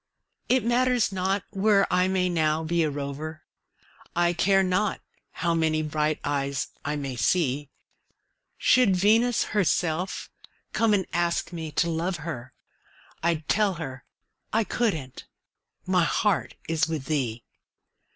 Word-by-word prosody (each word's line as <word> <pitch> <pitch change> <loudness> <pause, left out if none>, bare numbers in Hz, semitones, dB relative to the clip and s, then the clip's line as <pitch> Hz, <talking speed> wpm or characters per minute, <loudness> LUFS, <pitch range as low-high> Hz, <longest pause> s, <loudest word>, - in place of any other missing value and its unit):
It 255 -3 +3
matters 245 -2 +2
not 190 +1 0
where 200 0 +3
I 180 0 +3
may 185 -1 +1
now 160 -2 +1
be 170 +1 +1
a 155 - +2
rover, 145 +2 -5 0.7
I 175 0 +3
care 195 +3 +3
not 190 +2 0 0.3
how 170 0 -1
many 160 -1 +1
bright 155 0 0
eyes 140 -2 -1
I 150 - -2
may 135 -3 -4
see; 140 +3 +1 0.9
Should 245 -7 +4
Venus 225 +5 +3
herself 180 -2 0 0.4
come 225 -2 +3
and 190 -2 0
ask 170 +1 0
me 160 -2 -5
to 170 - +2
love 170 +3 -1
her, 130 -6 -6 0.7
I'd 160 -2 0
tell 205 -3 +2
her 135 -5 -7 0.5
I 225 +1 +2
couldn't 160 - -2 0.6
my 180 -2 +3
heart 170 - 0
is 160 -1 +1
with 155 -4 -3
thee. 125 -7 -2
170 Hz, 130 wpm, -26 LUFS, 155-195 Hz, 0.9 s, Should